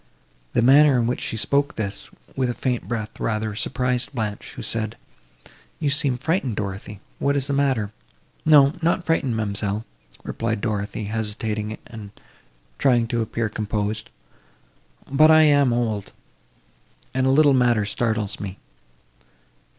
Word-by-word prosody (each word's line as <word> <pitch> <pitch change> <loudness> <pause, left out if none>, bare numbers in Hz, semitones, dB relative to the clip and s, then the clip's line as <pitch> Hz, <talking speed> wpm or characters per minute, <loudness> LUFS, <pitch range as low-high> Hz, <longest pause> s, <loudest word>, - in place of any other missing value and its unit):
The 120 - +2
manner, 140 +2 +6
in 120 - +2
which 120 +2 -1
she 110 - -3
spoke 140 +6 +1
this, 105 -2 -4 0.3
with 130 -2 0
a 120 - -2
faint 125 0 -2
breath, 110 -2 -4
rather 110 -1 -1
surprised 125 +2 -1
Blanche, 105 -4 -4
who - - -7
said, 110 -1 -2 0.8
"You 145 -3 0
seemed 140 -4 0
frightened, 145 - 0
Dorothée, 100 0 -5 0.2
what 140 0 +1
is 140 -2 +1
the 140 - -1
matter?" 135 -7 +1 0.5
"No, 145 -2 +6
not 170 +2 +1
frightened, 135 -8 0
ma'amselle," 105 0 -2 0.4
replied 115 -1 -2
Dorothée, 105 -1 -3
hesitating 110 0 -2
and 110 -3 -9 0.7
trying 120 -3 +3
to 120 0 0
appear 115 +1 -2
composed, 105 0 -3 1.0
"but 155 +3 +5
I 155 0 +7
am 145 -4 +4
old, 115 -4 -2 1.0
and—a 130 0 +1
little 145 +1 +5
matter 120 -4 +3
startles 110 -1 -1
me." 95 -2 -6
115 Hz, 135 wpm, -23 LUFS, 105-135 Hz, 1.0 s, I